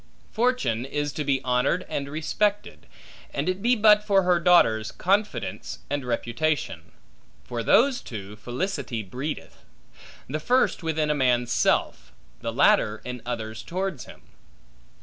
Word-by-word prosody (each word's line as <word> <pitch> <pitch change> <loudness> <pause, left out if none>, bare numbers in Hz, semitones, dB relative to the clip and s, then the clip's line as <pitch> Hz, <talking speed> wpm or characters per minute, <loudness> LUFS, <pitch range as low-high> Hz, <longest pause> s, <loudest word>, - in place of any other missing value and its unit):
Fortune 220 - 0
is 145 +2 -3
to 150 - -3
be 135 -2 0
honored 125 +8 +1
and 140 -1 -3
respected, 200 +7 -2 0.5
and 140 +4 -1
it 185 +1 -1
be 240 +3 +3
but 210 -1 +5
for 200 -2 +3
her 180 -1 +3
daughters, 115 -12 +4
Confidence 200 +3 -1
and 145 -1 -1
Reputation. 125 +5 -2 0.5
For 120 -2 -4
those 250 - +4
two, 105 -2 -8
Felicity 125 - -3
breedeth; 130 +10 -6 0.7
the 150 +4 -3
first 250 +11 +2
within 155 -2 0
a - - +3
man's 125 -4 +1
self, - - 0 0.3
the - - -3
latter 105 +1 +3
in 125 -1 -6
others 110 -2 -4
towards 185 -5 -4
him. - - -14
150 Hz, 135 wpm, -25 LUFS, 125-190 Hz, 0.7 s, but